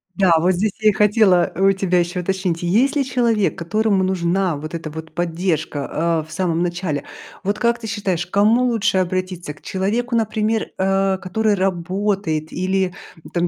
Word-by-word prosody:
Да, 190 Hz, -1 st, +3 dB
вот 175 Hz, +3 st, +3 dB
здесь 200 Hz, +3 st, 0 dB
я 215 Hz, -1 st, +4 dB
и -, -, +4 dB
хотела 205 Hz, -3 st, +3 dB
у 195 Hz, +1 st, +4 dB
тебя 185 Hz, -2 st, +1 dB
еще 175 Hz, +1 st, -1 dB
уточнить. 180 Hz, -2 st, -1 dB
Есть 230 Hz, -, +2 dB
ли 285 Hz, -, +2 dB
человек, 235 Hz, -5 st, +1 dB
которому 200 Hz, +3 st, +1 dB
нужна 185 Hz, -1 st, 0 dB
вот 155 Hz, +3 st, -6 dB
эта 165 Hz, -2 st, -6 dB
вот 160 Hz, +1 st, -8 dB
поддержка, 165 Hz, -2 st, -1 dB
а, 155 Hz, -, -3 dB
в 160 Hz, -, -16 dB
самом 170 Hz, -1 st, -1 dB
начале? 175 Hz, -4 st, -2 dB, 0.4 s
Вот 200 Hz, +2 st, -1 dB
как 235 Hz, 0 st, +1 dB
ты 225 Hz, -, -7 dB
считаешь, 190 Hz, -5 st, -2 dB
к -, -, -28 dB
кому 220 Hz, +5 st, +4 dB
лучше 225 Hz, -5 st, +1 dB
обратиться? 185 Hz, -3 st, -3 dB
К -, -, -21 dB
человеку, 225 Hz, +6 st, -1 dB
например, 220 Hz, 0 st, 0 dB
э, 195 Hz, 0 st, +1 dB
который 205 Hz, +3 st, 0 dB
работает 185 Hz, -3 st, -1 dB
или, 185 Hz, 0 st, 0 dB, 0.4 s
там, 175 Hz, 0 st, +1 dB
190 Hz, 175 wpm, -20 LUFS, 175-210 Hz, 0.4 s, я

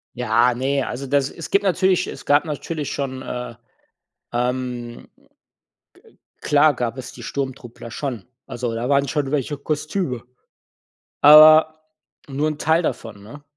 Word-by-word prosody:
Ja, 120 Hz, 0 st, +2 dB
ne, 135 Hz, +3 st, -1 dB
also 135 Hz, +3 st, -5 dB
das 140 Hz, 0 st, +1 dB
es 165 Hz, -, -9 dB
gibt 200 Hz, -, +2 dB
natürlich 185 Hz, -1 st, +1 dB
es -, -, -9 dB
gab 145 Hz, +1 st, +3 dB
natürlich 150 Hz, -1 st, -5 dB
schon, 130 Hz, -2 st, -4 dB
äh, 125 Hz, -2 st, -6 dB, 0.8 s
ähm, 125 Hz, -1 st, -3 dB
ge -, -, -29 dB, 1.1 s
klar 145 Hz, 0 st, +3 dB
gab 120 Hz, 0 st, -3 dB
es 130 Hz, -, -8 dB
die -, -, -11 dB
Sturmtruppler 130 Hz, -4 st, -6 dB
schon. 120 Hz, -4 st, -5 dB, 0.2 s
Also 120 Hz, -1 st, -4 dB
da 120 Hz, +2 st, -3 dB
waren 140 Hz, 0 st, +2 dB
schon 145 Hz, -1 st, -2 dB
welche 145 Hz, 0 st, -1 dB
Kostüme. 150 Hz, -, -3 dB, 1.0 s
Aber 155 Hz, +1 st, +8 dB, 0.5 s
nur 145 Hz, +2 st, -1 dB
'n 155 Hz, -1 st, -4 dB
Teil 160 Hz, +3 st, +2 dB
davon, 110 Hz, -9 st, -5 dB
ne? 140 Hz, +7 st, -12 dB
140 Hz, 140 wpm, -21 LUFS, 125-150 Hz, 1.1 s, Aber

